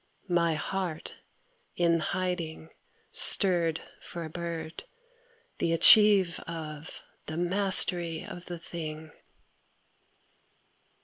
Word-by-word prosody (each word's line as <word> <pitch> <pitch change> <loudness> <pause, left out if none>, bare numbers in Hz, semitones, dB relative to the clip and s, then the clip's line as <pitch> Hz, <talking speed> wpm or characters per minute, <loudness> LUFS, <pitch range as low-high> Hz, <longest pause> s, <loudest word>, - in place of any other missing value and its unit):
My 170 -2 +1
heart 175 0 -5 0.6
in 170 -1 +1
hiding 170 -2 -5 0.4
Stirred 170 -5 +3 0.2
for 170 - -8
a 160 - -9
bird, 165 -1 -7 0.7
the 165 - -1
achieve 195 0 +5
of, 160 -2 -8 0.3
the 155 - -6
mastery 175 -2 +3
of 175 0 -11
the 175 - -7
thing! 160 -2 -9
170 Hz, 85 wpm, -27 LUFS, 160-180 Hz, 0.7 s, achieve